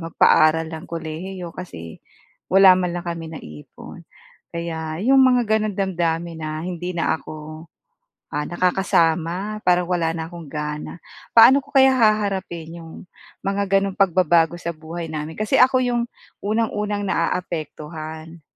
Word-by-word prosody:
magpaaral 160 -1 +3
ng 160 +2 -8
kolehiyo 170 +2 -6
kasi 85 - -9 0.5
wala 195 0 +7
man 180 -1 -1
lang 175 - -5
kami 170 -1 -4
naipon. 75 - -11 0.5
Kaya 160 -1 -4
iyong 270 +3 +4
mga 250 -2 +5 0.2
ganoon 215 -2 -2
damdamin 170 -3 -1
na 155 0 -4
hindi 180 0 -5
na 160 -1 0
ako 155 +1 -10 0.7
ah, 150 - 0
nakakasama 180 +2 0
parang 180 -1 +3
wala 170 -3 +1
na 160 0 -4
akong 170 -3 -10
gana. 150 +2 -5 0.3
Paano 250 +5 +7
ko 280 - -20
kaya 265 0 +6
haharapin 195 -8 0
iyong 165 -1 -11 0.5
mga 195 0 +2
ganong 195 -1 -2
pagbabago 175 -3 +3
sa 170 -1 -4
buhay 165 +2 -7
namin? 155 0 -6
Kasi 215 +5 -1
ako 255 +1 +5
iyong 240 -1 0 0.4
unang-unang 210 -1 -1
naaapektuhan. 160 -2 -4
170 Hz, 135 wpm, -22 LUFS, 160-195 Hz, 0.7 s, wala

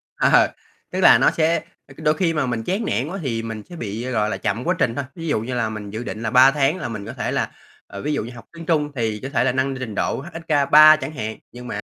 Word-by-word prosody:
Ờ, - - +4 0.4
tức - - -3
là - - +8
nó - - +4
sẽ 165 +1 +2 0.3
ơ, 135 - -14
cứ - - -10
đôi 150 - +4
khi 165 0 0
mà 150 -3 0
mình 120 -3 -2
chán 195 - -2
nản 120 - -1
quá 190 +5 -5
thì 115 -5 -2
mình 110 -2 -6
sẽ 175 - -9
bị, 115 -2 -5
gọi 105 -3 +1
là, - - -2
chậm 115 +5 -2
quá 180 +5 +1
trình 115 -2 +1
thôi. 140 - -2
Ví 165 -1 -6
dụ 145 -8 +1
như 125 +3 -5
là 115 -2 0
mình 105 -2 -7
dự 110 +3 -5
định 110 -2 -6
là 110 - -2
3 130 +2 +7
tháng 145 +3 +1
là - - -4
mình 105 -3 -6
có 110 - -7
thể 125 -2 -3
là - - -1 0.4
ờ, 100 - -8
ví 150 - -1
dụ 145 - -1
như 120 - -8
học 115 - -12
tiếng 165 0 -9
Trung 150 -3 +1
thì 110 -3 -2
có 135 - -4
thể 120 -4 +1
là 125 - +2
nâng 135 +1 -1
trình 115 -5 -5
độ - - -1
HSK3 155 -2 +5
chẳng 145 -1 -5
hạn. 110 -5 -5
Nhưng 125 0 -10
mà - - -4
130 Hz, 290 wpm, -21 LUFS, 115-155 Hz, 0.4 s, là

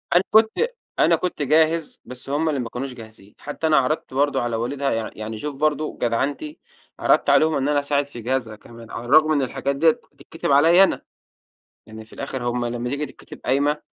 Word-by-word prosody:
أنا 180 - +5
كنت 220 0 +5 0.5
أنا - - +5
كنت 180 -4 -3
جاهز 155 +2 +1
بس 125 +1 -9
همّ 155 +3 0
اللي 145 - -1
ما 120 -2 -4
كانوش 125 +2 -5
جاهزين. 110 -4 -14
حتّى 150 +2 -4
أنا 155 -1 +4
عرضت 135 +1 0
برضو 145 +2 +1
على 120 -1 -2
والدها 135 +4 -2
يع 115 -1 -2
يعني 110 +1 -6
شوف 145 +4 -5
برضو 155 +1 -1
جدعنتي، 140 - -2 0.4
عرضت - - +3
عليهم 155 0 +4
إن 135 0 0
أنا 145 -1 +2
أساعد 145 0 0
في 120 -4 -10
جهازها 120 -2 -2
كمان، 115 +1 -14
على 120 - -6
الرغم 155 +4 +5
من 145 - +2
الحاجات 135 +1 -2
ديّة 160 +3 +5 0.2
بتتكتب 165 - -5
عليَّ 165 +7 +6
أنا. 195 - +1 0.8
يعني 110 0 -11
في - - -18
الآخر 135 -2 -5
همّ 120 0 -2
لمّا 120 +1 -3
تييجي 145 +3 -2
تكتب - - -13
قايمة 145 +3 +1
140 Hz, 200 wpm, -22 LUFS, 120-155 Hz, 0.8 s, عليَّ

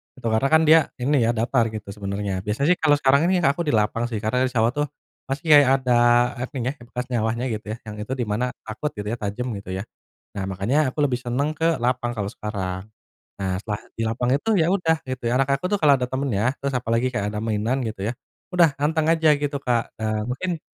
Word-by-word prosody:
Itu 125 -3 -5
karena 110 +5 +2
kan 160 +3 +5
dia 160 +1 +7 0.2
ini 130 -2 +2
ya, 120 - +1
datar 115 +1 +2
gitu 105 -2 -7
sebenarnya. 100 -1 -3
Biasanya 105 +9 -1
sih 180 - +2
kalau 150 -2 +4
sekarang 140 +3 +3
ini 180 -1 +2
aku 150 +4 +1
di 145 - +2
lapang 110 +2 +1
sih, 110 -3 -4
karena 125 +4 +1
di 130 - -6
sawah 115 +1 +3
tuh 145 +2 -1 0.4
masih 135 +2 -3
kayak 145 -3 +8
ada 125 - 0 0.5
apa 125 +3 -5
nyah 130 +1 -1 0.2
bekas 125 +1 -4
nyawahnya 115 +1 0
gitu 110 0 -4
ya, - - -13
yang 110 -1 -8
itu 105 +5 -4
di 125 - -2
mana 110 +4 0 0.2
takut 115 +7 -4
gitu 105 0 -4
ya, 115 - -4
tajam 115 +4 -3
gitu 95 -2 -6
ya. 95 - -3 0.5
Nah, 95 - -2
makanya 100 +9 -1 0.2
aku - - -6
lebih 125 -3 0
seneng 125 +4 -1
ke 165 - 0 0.2
lapang 125 0 0
kalau 100 -1 -2
sekarang. 95 -3 -4 0.6
Nah, 95 -1 -1
setelah 105 -2 -4 0.2
di 115 - -1
lapang 120 +2 -1
itu 150 +11 -3
ya 160 - +2
udah 165 -4 +2
gitu 130 -1 -5
ya, - - 0
anak 135 0 +1
aku - - -6
tuh 205 - +3
kalau 145 -3 +6
ada 125 - -1
temennya, 130 -6 -1 0.2
terus 140 0 -2
apalagi 115 +1 0
kayak 105 -4 -1
ada 105 - -2
mainan 115 +4 0
gitu 110 -3 -6
ya, 115 - -1 0.4
udah 175 -2 +6
anteng 155 +1 +1
aja 160 -1 +3
gitu, 145 0 -1
Kak. 120 -3 +1 0.2
Nah, 110 -1 -1
mungkin 170 +6 -2
125 Hz, 230 wpm, -23 LUFS, 110-140 Hz, 0.6 s, kayak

